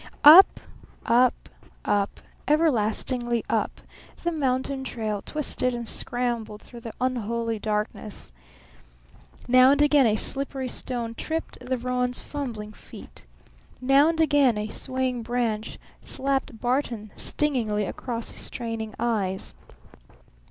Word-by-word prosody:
Up, 330 +7 +10 0.5
up, 245 +2 +3 0.4
up, 200 -1 0 0.3
everlastingly 240 -5 +1
up, - - -1 0.4
the 345 - +1
mountain 265 -3 -1
trail 215 -5 -3
twisted 255 -4 -2
and 235 -1 -5
scrambled 235 -4 -2
through 240 - -11
the 230 -1 -8
unholy 235 -2 -1
darkness. 210 - -3 1.2
Now 255 +1 +7
and 280 +1 +4
again 290 -3 +5
a 215 - +2
slippery 270 +2 -1
stone 235 -2 -3
tripped 320 +7 -4
the 255 +1 -2
roan's 250 0 -1
fumbling 230 -7 -6
feet. - - -13 0.5
Now 270 +4 +5
and 330 -1 -2
again 290 -7 +4
a 210 +1 -3
swaying 260 -1 -1
branch 230 -2 -2 0.2
slapped 270 -4 -2
Barton 240 -4 -1
stingingly 230 -8 -1
across 230 +3 -4
his - - -7
straining 225 -3 -5
eyes. 205 -5 -1
245 Hz, 115 wpm, -25 LUFS, 225-265 Hz, 1.2 s, Up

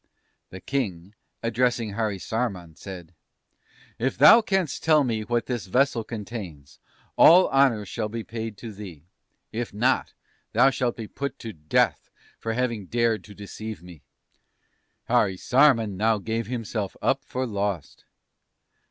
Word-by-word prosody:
"The 95 - -9
King, 100 -9 -3 0.3
addressing 115 -1 0
Harisarman, 100 -4 -3
said: 90 -3 -10 0.9
"'If 130 +3 -1
thou 155 - +9
canst 190 -6 -1
tell 155 -2 +5
me 115 -4 -1
what 120 +2 -1
this 120 -7 -4
vessel 125 +2 +2
contains 100 - -8 0.4
all 180 +3 +7
honours 130 -7 +3
shall 110 0 -3
be 115 +1 -5
paid 110 -2 -6
to 115 -1 -8
thee, 95 -8 -10 0.5
if 115 +1 -4
not, 125 +5 +1 0.4
thou 135 - +5
shalt 125 -2 -1
be 110 -2 -6
put 140 +2 -5
to 110 -1 -7
death 75 -2 0 0.3
for 115 - -3
having 115 -5 -2
dared 115 0 +1
to 105 - -13
deceive 105 0 -8
me!' 90 -4 -13 1.1
"Harisarman 115 +1 +3
now 110 +2 +2
gave 110 +3 -3
himself 115 -4 -4
up 135 +1 +1
for 130 -1 -3
lost. 100 - -4
115 Hz, 135 wpm, -25 LUFS, 100-125 Hz, 1.1 s, thou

